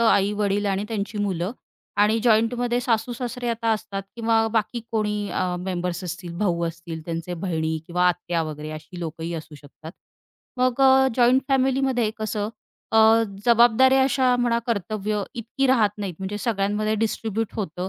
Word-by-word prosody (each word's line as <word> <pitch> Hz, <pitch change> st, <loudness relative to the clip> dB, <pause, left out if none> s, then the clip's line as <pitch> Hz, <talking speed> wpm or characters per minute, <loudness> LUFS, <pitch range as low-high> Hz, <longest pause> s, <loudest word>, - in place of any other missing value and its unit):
आई-वडील 205 Hz, -2 st, +2 dB
आणि 195 Hz, +1 st, 0 dB
त्यांची 210 Hz, -1 st, -3 dB
मुलं 190 Hz, 0 st, -1 dB, 0.5 s
आणि 215 Hz, +2 st, +4 dB
जॉइंटमध्ये 240 Hz, +2 st, +2 dB
सासू-सासरे 245 Hz, +1 st, -2 dB
आता 230 Hz, 0 st, -2 dB
असतात 200 Hz, -2 st, -4 dB
किंवा 225 Hz, -1 st, +2 dB
बाकी 230 Hz, +2 st, 0 dB
कोणी 210 Hz, -2 st, -1 dB
अ, 180 Hz, 0 st, -1 dB
मेंबर्स 180 Hz, 0 st, -3 dB
असतील. 175 Hz, 0 st, -6 dB
भाऊ 170 Hz, -4 st, 0 dB
असतील 165 Hz, 0 st, -6 dB
त्यांचे 170 Hz, +1 st, -4 dB
बहिणी 160 Hz, -3 st, -2 dB
किंवा 180 Hz, +1 st, +1 dB
आत्या 170 Hz, -1 st, -1 dB
वगैरे, 155 Hz, 0 st, -6 dB
अशी 155 Hz, +3 st, -9 dB
लोकंही 165 Hz, 0 st, -5 dB
असू 155 Hz, -1 st, -8 dB
शकतात. 150 Hz, +3 st, -12 dB, 0.7 s
मग 255 Hz, +1 st, +1 dB
अ, 265 Hz, 0 st, +6 dB
जॉइंट 250 Hz, +2 st, +5 dB
फॅमिलीमध्ये 265 Hz, -3 st, +2 dB
कसं 215 Hz, -1 st, -2 dB, 0.4 s
अ, 225 Hz, +1 st, +6 dB, 0.2 s
जबाबदाऱ्या 240 Hz, +3 st, +5 dB
अशा 260 Hz, -2 st, +3 dB
म्हणा 240 Hz, -1 st, +1 dB
कर्तव्य 210 Hz, -1 st, -1 dB
इतकी 240 Hz, +4 st, -1 dB
राहत 230 Hz, -6 st, +4 dB
नाहीत 195 Hz, -4 st, -4 dB
म्हणजे 195 Hz, +2 st, -4 dB
सगळ्यांमध्ये 215 Hz, -1 st, 0 dB
डिस्ट्रिब्यूट 225 Hz, 0 st, -2 dB
होतं 185 Hz, -2 st, -3 dB
210 Hz, 145 wpm, -24 LUFS, 180-235 Hz, 0.7 s, अ